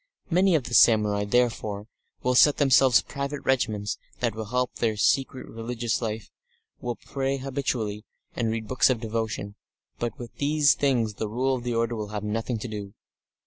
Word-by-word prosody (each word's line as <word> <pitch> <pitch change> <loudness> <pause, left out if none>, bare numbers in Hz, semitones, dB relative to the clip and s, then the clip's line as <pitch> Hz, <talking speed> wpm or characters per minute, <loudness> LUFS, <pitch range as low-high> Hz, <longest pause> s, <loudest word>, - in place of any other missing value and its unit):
Many 185 +1 +4
of 150 - +1
the 120 - -7
samurai, 105 -4 +5
therefore, 110 -2 0 0.4
will 125 - +2
set 145 +3 +6
themselves 135 -3 +5
private 140 0 -5
regimens 110 -6 0 0.2
that 120 -3 0
will 110 0 -5
help 125 +3 -1
their 110 -2 0
secret 130 +5 +1
religious 115 0 -3
life, 110 -1 -4 0.5
will 120 -1 -3
pray 135 +2 -3
habitually, 125 -6 -3 0.3
and 115 -2 0
read 110 -1 -3
books 130 +2 +3
of 125 -3 +1
devotion, 110 -2 -3 0.5
but 120 -2 -3
with 120 -3 -9
these 145 0 +4
things 120 -6 +1
the 105 +1 -4
Rule 130 +4 0
of 125 -2 -3
the 120 -1 -2
order 115 +1 0
will 105 -2 -4
have 105 0 -5
nothing 115 +3 -2
to 110 - -5
do. 105 -2 -7
120 Hz, 175 wpm, -26 LUFS, 110-130 Hz, 0.5 s, set